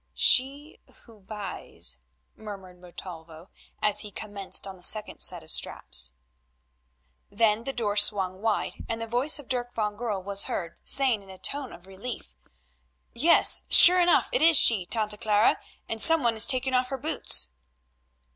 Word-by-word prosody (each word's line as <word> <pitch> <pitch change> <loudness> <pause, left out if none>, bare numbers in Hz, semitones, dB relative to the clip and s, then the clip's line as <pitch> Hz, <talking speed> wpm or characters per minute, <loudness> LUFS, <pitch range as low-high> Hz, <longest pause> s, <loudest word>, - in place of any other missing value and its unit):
"She 280 +4 +1 0.2
who 225 -3 -19
buys," 195 - -4 0.4
murmured 195 -4 -12
Montalvo 170 -1 -12 0.3
as 210 - +1
he 210 - -5
commenced 205 -2 -2
on 195 -1 -10
the 180 - -20
second 210 +4 +1
set - - -1
of - - -10
straps. 60 0 -1 1.2
Then 225 0 -1
the 270 - -4
door 215 -6 -4
swung 195 -2 +2
wide, 220 -1 -3
and 225 0 -4
the 230 - -5
voice 245 +7 +1
of 290 - -13
Dirk 245 -2 -4
van 210 -2 -3
Goorl 210 -4 -5
was 200 +1 -1
heard 170 -2 -7
saying 260 -6 +1
in 195 - -19
a 190 - -13
tone 280 +5 -3
of 175 - -15
relief: 195 - -10 0.8
"Yes, 325 +8 +4
sure 360 +1 +8
enough 350 0 +2
it - - +1
is 330 -1 +5
she, 200 -10 +4
Tante 215 -1 -2
Clara, 210 +1 +1 0.3
and 225 -1 -1
some 325 +1 +5
one 235 -1 0
is 220 +1 +2
taking 260 0 -1
off 250 0 0
her 270 - -6
boots." 240 - 0
215 Hz, 165 wpm, -25 LUFS, 195-250 Hz, 1.2 s, sure